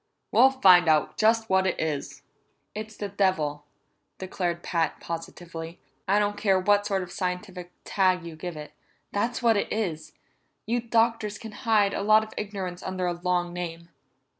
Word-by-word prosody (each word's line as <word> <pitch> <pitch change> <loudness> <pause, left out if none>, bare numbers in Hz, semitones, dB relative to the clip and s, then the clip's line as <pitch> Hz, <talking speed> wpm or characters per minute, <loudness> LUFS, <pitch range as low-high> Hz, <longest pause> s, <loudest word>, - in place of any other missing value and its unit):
We'll 265 - +7
find 185 -10 +6
out 155 -2 +2
just 225 +1 +3
what 190 -1 +2
it - - -1
is." 155 -3 -3 0.5
"It's 215 +1 -7
the 205 - -3
devil," 170 -7 0 0.5
declared 175 -2 -3
Pat 165 -2 -1
positively. 165 0 -7 0.3
"I 195 +2 +3
don't 205 0 +1
care 195 -3 +3
what 205 +2 +2
sort 195 -2 0
of 175 - -10
scientific 180 0 -4
tag 185 -3 +1
you 165 -1 -8
give 170 0 -6
it 150 0 -8 0.4
that's 235 +5 -1
what 225 -2 +4
it - - -2
is. 160 -8 -3 0.5
You 235 +3 0
doctors 230 -2 +1
can 225 - -9
hide 210 -3 +2
a - - -2
lot 215 +1 +5
of 220 - -10
ignorance 190 -4 -5
under 185 -1 -3
a 175 - 0
long 175 0 -1
name." 170 -1 -6
190 Hz, 165 wpm, -26 LUFS, 175-210 Hz, 0.5 s, We'll